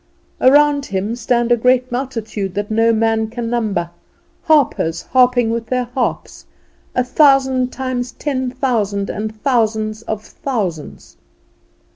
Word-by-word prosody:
Around 285 +1 +4
Him 200 +3 -2
stand 240 -1 0
a - - +7
great 250 +1 +2
multitude 225 -7 -4
that 205 +1 -3
no 225 +1 +3
man 225 0 +1
can 235 0 -4
number, 205 -8 -1 0.5
harpers 245 - +2
harping 250 -2 +3
with 230 0 -3
their 250 -1 0
harps, 255 -2 -3 0.5
a 250 - +2
thousand 265 -1 +3
times 255 -2 -3
ten 260 -4 -2
thousand, 220 -6 -1
and 215 +1 -5
thousands 220 -4 0
of 220 -2 -5
thousands. 195 - -5
240 Hz, 125 wpm, -18 LUFS, 215-255 Hz, 0.5 s, a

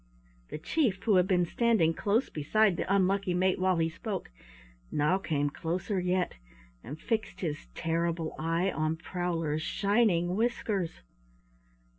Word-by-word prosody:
The - - -5
chief, 200 - 0
who 210 -5 +4
had 180 0 +4
been 180 -2 +3
standing 215 -4 +2
close 210 +9 +1
beside 195 +6 +2
the 185 - -2
unlucky 195 -1 +2
mate 185 +1 +2
while 185 -1 +2
he 165 0 +2
spoke, 190 - -5 0.6
now 150 +6 +2
came 145 -6 -1
closer 185 +6 -2
yet 180 0 0 0.5
and 145 +6 -8
fixed 220 +3 -2
his 150 - -3
terrible 165 0 -1
eye 165 +4 0
on 155 0 -1
Prowler's 165 -3 -2
shining 195 -2 +2
whiskers. 210 - -1
180 Hz, 135 wpm, -30 LUFS, 165-200 Hz, 0.6 s, who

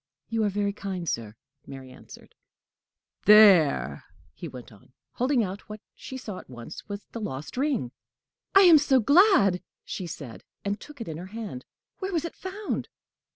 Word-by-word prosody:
"You 225 -1 0
are - - +2
very 200 0 -1
kind, 190 -4 -5
sir," 115 -5 -3 0.3
Mary 130 -1 -10
answered. 130 - -15 0.9
"There!" 165 - +6 0.3
he - - -8
went 125 -2 -10
on, 105 +4 -20 0.2
holding 255 -1 +1
out 195 +2 -6
what 210 0 -7
she 260 - -8
saw 210 -7 -7
at - - -15
once 125 - -10
was 205 0 -6
the 230 - -6
lost 145 -7 -6
ring. 260 - -1 0.6
"I 390 - +9
am 335 -4 +8
so 275 -2 +3
glad!" 265 - +5 0.2
she 180 - -5
said, 125 - -9 0.2
and 200 +1 -2
took 295 -4 -12
it 230 - -5
in 160 -1 -5
her 180 +3 -8
hand. 195 - -6 0.3
"Where 385 0 -3
was 330 -1 0
it 335 - -5
found?" 395 +3 -4
200 Hz, 170 wpm, -26 LUFS, -, 0.9 s, I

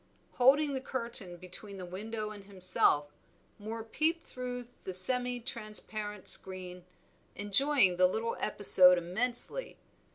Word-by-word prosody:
Holding 280 +3 +3
the 265 - -3
curtain 230 -9 -2
between 185 +3 -11
the 185 - -8
window 215 +4 -6
and 205 -2 -12
himself, 180 -6 +2 0.5
Moor 220 +2 -7
peeped 320 +9 -2
through 250 -1 -7 0.2
the 185 - -5
semi 245 +5 +2
transparent 215 -3 -5
screen, 180 -1 +1 0.5
enjoying 205 -1 +2
the 185 0 +4
little 225 +5 -3
episode 185 -3 +5
immensely. 240 - -2
215 Hz, 120 wpm, -30 LUFS, 185-245 Hz, 0.5 s, episode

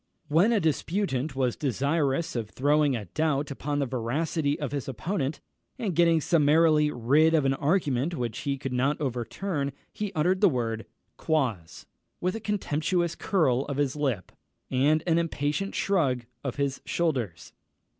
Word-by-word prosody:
When 170 +9 +4
a 225 - +3
disputant 155 -4 -1
was 130 -3 0
desirous 140 +3 0
of 115 -3 -3
throwing 145 +2 +2
a 110 -3 -4
doubt 150 - -1
upon 145 +1 -3
the 140 - +1
veracity 145 +5 -1
of 145 -4 -3
his 140 -3 -3
opponent, 140 - -3 0.4
and 210 -9 -2
getting 170 -1 +4
summarily 155 -1 +4
rid 150 +6 +3
of 150 -3 +2
an 135 - +3
argument 145 0 0
which 120 -3 -3
he 140 -1 -2
could 130 -1 -5
not 135 +4 +1
overturn, 140 - -2 0.2
he 210 -2 -3
uttered 180 +4 +1
the 200 - +7
word 115 -5 -2 0.3
Quoz, 125 - -1 0.3
with 180 +1 0
a - - -3
contemptuous 175 -4 -1
curl 155 -11 +1
of 140 -1 -4
his 145 -2 0
lip, 135 - -2 0.4
and 150 +5 +3
an 170 -1 +3
impatient 165 +3 -2
shrug 135 -11 +1 0.2
of 130 -4 -3
his 140 -1 -1
shoulders. 125 - -2
145 Hz, 155 wpm, -27 LUFS, 130-165 Hz, 0.4 s, the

